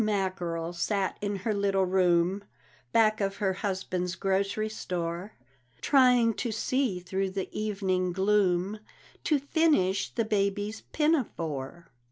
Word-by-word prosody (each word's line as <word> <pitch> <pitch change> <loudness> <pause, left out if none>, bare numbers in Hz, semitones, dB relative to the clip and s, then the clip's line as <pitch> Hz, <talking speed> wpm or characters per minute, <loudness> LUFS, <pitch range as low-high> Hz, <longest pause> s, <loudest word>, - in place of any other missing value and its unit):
Mackerel 185 -5 -2
sat 195 +2 -1
in 205 0 -1
her 205 +3 -2
little 195 -1 +1
room, 180 +1 +2 0.5
Back 215 -1 +3
of 195 0 0
her 200 -2 0
husband's 185 -2 -2
grocery 195 +2 0
store, 180 -2 -4 0.5
Trying 250 -4 +4
to 235 - -2
see 225 -2 0
through 190 +2 -2
the 190 0 -5
evening 195 -4 0
gloom, 195 +1 +1 0.5
To 300 - +3
finish 280 - +2
the 230 - -1
baby's 205 0 -1
pinafore. 170 - -1
195 Hz, 120 wpm, -28 LUFS, 185-215 Hz, 0.5 s, Trying